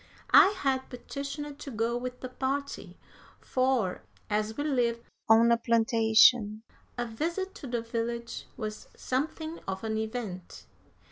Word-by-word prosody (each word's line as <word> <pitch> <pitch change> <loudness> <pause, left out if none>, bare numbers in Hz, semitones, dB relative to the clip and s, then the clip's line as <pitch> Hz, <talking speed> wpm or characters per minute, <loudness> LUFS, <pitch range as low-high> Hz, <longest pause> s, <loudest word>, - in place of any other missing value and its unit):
I - - +10
had 265 -6 0
petitioned 280 +3 -6
to - - -7
go 230 -1 -1
with 250 +1 -5
the 255 - -5
party, 275 +2 -3 0.4
for, 255 -7 0 0.3
as 215 +1 0
we 290 - -1
lived 240 -5 0 0.3
on 230 +1 +7
a 235 - +5
plantation, 225 -1 +4 0.3
a 240 - -1
visit 340 - -3
to 275 - -6
the 240 -2 -2
village 235 0 -4
was 215 0 -5
something 315 +5 -3
of 190 +1 -4
an 220 -1 -1
event. 220 -5 -5
235 Hz, 135 wpm, -29 LUFS, 225-270 Hz, 0.4 s, I